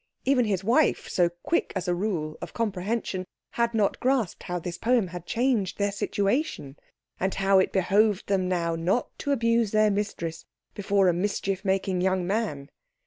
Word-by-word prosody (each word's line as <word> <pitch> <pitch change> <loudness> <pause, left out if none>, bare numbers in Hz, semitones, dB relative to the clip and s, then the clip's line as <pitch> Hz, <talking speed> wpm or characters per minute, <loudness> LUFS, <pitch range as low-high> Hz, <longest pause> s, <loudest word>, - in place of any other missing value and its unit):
Even 260 -3 +3
his 195 -3 -1
wife, 250 +9 +2
so 175 -2 +2
quick 175 - -2
as 185 -1 -3
a 180 - +2
rule 175 -5 -2
of - - -8
comprehension, 205 -2 -2 0.3
had 235 0 0
not 210 -3 +1
grasped 255 -7 0
how 180 - -3
this 175 0 -5
poem 235 -5 +2
had 175 0 -8
changed 235 -6 0
their 200 0 +1
situation, 200 - -1 0.4
and 190 +1 -1
how 195 0 +4
it 190 - +1
behoved 200 +2 +2
them 190 -2 0
now 170 -2 0
not 180 +9 -1
to 285 - -2
abuse 230 -4 +2
their 215 0 +3
mistress 170 -5 -3 0.3
before 200 -1 +2
a 175 - +4
mischief 195 +1 -2
making 190 -2 0
young 185 -1 +1
man. 190 -9 -2
195 Hz, 170 wpm, -26 LUFS, 180-225 Hz, 0.4 s, how